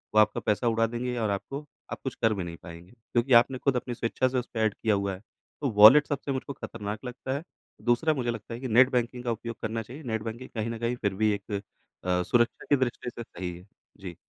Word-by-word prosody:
वो - - +7
आपका 105 0 +4
पैसा 110 +3 0
उड़ा 115 0 +3
देंगे 125 +1 -3
और 110 -2 0
आपको 135 +9 -4 0.3
आप - - -4
कुछ 130 - -3
कर 110 -1 +4
भी 95 - -3
नहीं 85 -1 -7
पाएँगे 85 +1 -11
क्योंकि 120 +2 -1
आपने 130 +2 -5
ख़ुद 135 +1 +1
अपनी 125 0 -2
स्वेच्छा 115 +2 0
से 130 0 -1
उसपे 120 -2 -6
ऐड 110 -2 +2
किया 110 -2 +1
हुआ 100 0 -1
है, 95 - -8 0.4
तो 140 - +1
वॉलेट 110 +8 +9
सबसे 145 0 -2
मुझको 135 +1 -3
ख़तरनाक 105 -2 -6
लगता 125 +1 -4
है। 155 - -7 0.4
दूसरा 120 +7 +3
मुझे 125 -4 -1
लगता 115 0 -7
है 115 - -5
कि 130 - -4
नेट 125 +3 +6
बैंकिंग 125 0 -1
का 120 - 0
उपयोग 115 +1 -4
करना 110 +1 -2
चाहिए, 130 +8 -10
नेट 110 -4 -2
बैंकिंग 115 +3 -6
कहीं 110 0 -1
न 115 - -4
कहीं 120 +1 0
फिर 100 -5 -1
भी 110 +2 +2
एक 100 +1 -6 0.5
अ, 90 0 +2
सुरक्षा 120 +4 +1
की 145 - +6
दृष्टि 125 -1 -2
से 120 0 -7
सही 90 -4 -6
है। 90 +3 -16 0.3
जी। 90 -3 -7
115 Hz, 245 wpm, -28 LUFS, 105-125 Hz, 0.5 s, वॉलेट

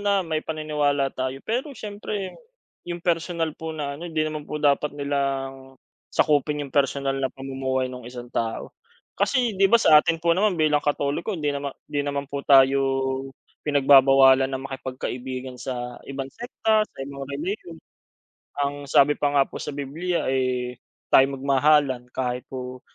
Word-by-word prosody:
na 205 0 +2
may 160 -2 -1
paniniwala 150 -3 -1
tayo. 130 +1 -3
Pero 245 +7 -1
siyempre 205 -2 -5 0.6
yung 175 0 -5
personal 165 -1 0
po 160 +1 -7
na 145 -2 -3
ano 175 - -5
hindi 155 -2 0
naman 155 -1 -5
po 150 - -3
dapat 145 0 +1
nilang 135 -2 -3 0.3
sakupin 150 -1 +1
yung 135 - -11
personal 135 0 +1
na 130 - +1
pamumuhay 130 -1 -3
nung 125 -2 -8
1 120 -1 -9
tao. 115 -1 -3 0.4
Kasi 250 -4 +1
'di 195 0 +3
ba, 235 - +7
sa 155 -9 +7
atin 165 +2 0
po 170 +1 +2
naman 195 +1 +2
bilang 155 -2 +3
Katoliko, 145 +7 -1
hindi 150 -3 -1
naman 140 -1 -4
hindi 145 - -2
naman 140 0 -2
po 140 0 -5
tayo 135 0 +5 0.9
pinagbabawalan 135 -2 +6
na 135 - -3
makipagkaibigan 130 -1 -6
sa 125 -2 -5
ibang 135 -1 -5
sekta, 220 -3 0
sa - - -25
ibang 140 0 -8
relihiyon. 170 +4 -5 0.9
Ang 140 0 -5
sabi 145 +1 +5
pa 145 -1 0
nga 140 - +6
po - - -8
sa - - -5
Bibliya, 150 +5 -3
eh, 125 -2 -1 0.3
tayo'y 135 +1 +7
magmahalan 135 -1 +2
kahit 125 0 -2
po 125 -1 -7
140 Hz, 155 wpm, -24 LUFS, 135-155 Hz, 0.9 s, ba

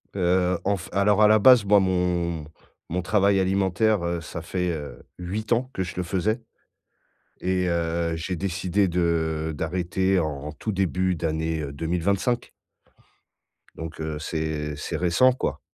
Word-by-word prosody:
Heu, 90 -1 +2
en 100 +1 +1
f 90 - -9
alors 100 +1 +3
à 105 - +8
la 110 0 +5
base, 125 -1 +7
moi 100 +1 +6
mon 90 -4 0 0.4
mon 90 +2 -1
travail 100 +1 +3
alimentaire, 95 +2 +1
heu, 85 0 -2
ça 80 +1 -7
fait, 90 +2 -2
heu, 75 -4 -7 0.2
8 100 +6 -4
ans 125 +2 +2
que 95 - -1
je 90 - -7
le 90 - 0
faisais 100 +6 -1 1.0
et 90 0 0
heu, 85 -1 0
j'ai 85 +3 -3
décidé 95 +2 0
de 80 -2 0
d'arrêter 90 +4 0
en 75 -2 -4
tout 95 +8 -4
début 95 -1 0
d'année, 80 0 -1
heu, 70 -2 -5
2025 90 - -1 1.3
donc, 80 0 -7
heu, 80 -1 -3
c'est 75 -1 -3
c'est 80 +3 -4
récent, 90 +10 +4
quoi. 125 - -3
90 Hz, 155 wpm, -25 LUFS, 80-95 Hz, 1.3 s, à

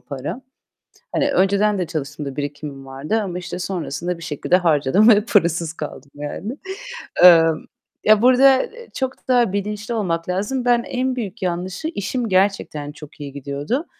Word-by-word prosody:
para. 140 - -6 0.7
Hani 285 - +1
önceden 200 0 +2
de 180 -2 -2
çalıştığımda 145 -3 -5
birikimim 145 -1 -6
vardı 140 +12 -2
ama 185 -4 -4
işte 180 0 -6
sonrasında 175 -1 -3
bir 165 - -10
şekilde 170 +2 +1
harcadım 165 - +3
ve 210 -2 +6
parasız 170 -6 +2
kaldım 145 -3 -8
yani. 175 - -5 0.7
Eee, 170 -2 +10 0.6
ya 215 -1 +6
burada, 260 +2 +6
eee, 475 0 -10
çok 260 0 -4
da 240 -6 +3
bilinçli 210 +3 -3
olmak 180 -6 -2
lazım. 210 +8 -1
Ben 240 -1 +3
en 255 +1 -2
büyük 220 -3 -5
yanlışı 180 - -3
işim 225 +3 -2
gerçekten 185 -6 0
çok 150 0 -13
iyi 145 -1 -6
gidiyordu 145 - -3
185 Hz, 150 wpm, -21 LUFS, 150-225 Hz, 0.7 s, Eee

